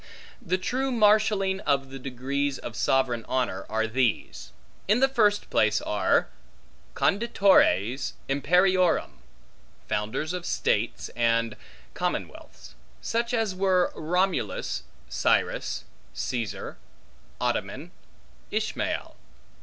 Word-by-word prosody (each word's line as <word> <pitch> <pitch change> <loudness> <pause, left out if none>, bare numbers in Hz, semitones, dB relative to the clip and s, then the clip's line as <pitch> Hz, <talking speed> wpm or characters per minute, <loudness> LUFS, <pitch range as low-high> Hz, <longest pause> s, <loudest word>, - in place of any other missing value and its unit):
The 185 +2 0
true 260 +8 -1
marshalling 210 -4 +3
of 140 -6 0
the 135 - -7
degrees 135 +2 -2
of 115 - -8
sovereign 125 -3 +1
honor, 125 -7 -1
are 110 0 0
these: 120 -1 -1 0.4
In 210 +5 +4
the 270 - +5
first 210 -6 +2
place 110 -1 +3
are 105 - +1 0.7
conditores 190 - +3
imperiorum, 180 +6 +2 0.7
founders 110 +11 -2
of 180 -1 -4
states - - -1
and 115 -1 +1 0.4
commonwealths; - - -5 0.3
such 235 +1 -1
as 225 -5 0
were 185 -1 +2
Romulus, 180 +4 -1 0.3
Cyrus, - - 0 0.3
Caesar, 115 - -4 0.6
Ottoman, - - -2 0.6
Ismael. - - -2
155 Hz, 95 wpm, -26 LUFS, 120-195 Hz, 0.7 s, the